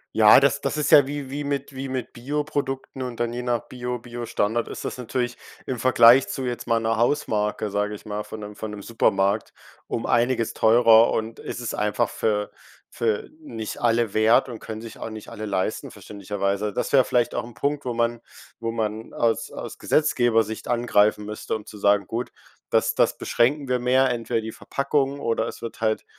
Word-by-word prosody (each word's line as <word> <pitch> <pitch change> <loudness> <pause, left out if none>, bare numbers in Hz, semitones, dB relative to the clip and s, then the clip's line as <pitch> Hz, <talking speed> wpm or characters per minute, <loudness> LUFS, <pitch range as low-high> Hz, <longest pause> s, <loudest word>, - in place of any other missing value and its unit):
Ja, 110 +2 +8
das 140 0 +2
das - - -2
ist 150 - 0
ja 140 -2 +8
wie 140 -2 -5
wie 145 +1 -3
mit 140 -1 -3
wie 135 +1 -5
mit 130 -2 -4
Bioprodukten 135 0 -3
und 125 -2 -5
dann 120 0 -1
je 125 - -3
nach 120 -2 -2
Bio 125 0 -4
Bio-Standard 120 -1 -2
ist - - -7
das - - -4
natürlich 125 0 -2 0.3
im 125 -2 -3
Vergleich 125 +1 +6
zu 135 - -4
jetzt 120 -1 -4
mal 115 -1 +3
'ner 115 0 0
Hausmarke, 105 -5 0
sage 105 +1 -1
ich - - -13
mal, 105 0 -4
von 110 +1 -9
'nem 105 0 -8
von 110 +1 -6
'nem 105 -1 -8
Supermarkt 100 -2 +1 0.3
um 115 - -3
einiges 120 -1 +1
teurer 115 0 +6
und 110 +1 -3
es - - -6
ist 120 - -3
einfach 105 0 0
für 105 -2 -1 0.4
für 110 -3 -1
nicht 110 - -6
alle 115 -3 +2
wert 110 +4 +4
und 115 - -7
können 110 0 -7
sich 115 -1 -10
auch - - -5
nicht 110 -1 -9
alle 110 0 -6
leisten 95 -2 -2
verständlicherweise. 100 0 -3
Das - - -3
wäre 135 -2 +7
vielleicht 120 -1 +1
auch - - -2
'n 120 -1 -12
Punkt, 140 +6 -1
wo 120 -2 -3
man 115 0 0 0.4
wo 115 0 -2
man 110 -1 -3
aus 115 -1 0
aus - - -8
Gesetzgeber-Sicht 115 -7 +1
angreifen 105 -3 +2
müsste, 105 +1 -4
um 105 -1 -7
zu 105 - -11
sagen: 100 0 +3
„Gut, 115 +5 -4 0.4
das - - +2
das - - +2
beschränken 140 +4 +1
wir 125 0 +1
mehr, 130 +1 +3
entweder 115 -1 -1
die 110 0 -6
Verpackung 140 +2 -1
oder 115 -4 0
es - - -8
wird 115 0 -7
halt, 110 -1 0
115 Hz, 195 wpm, -24 LUFS, 110-125 Hz, 0.4 s, Ja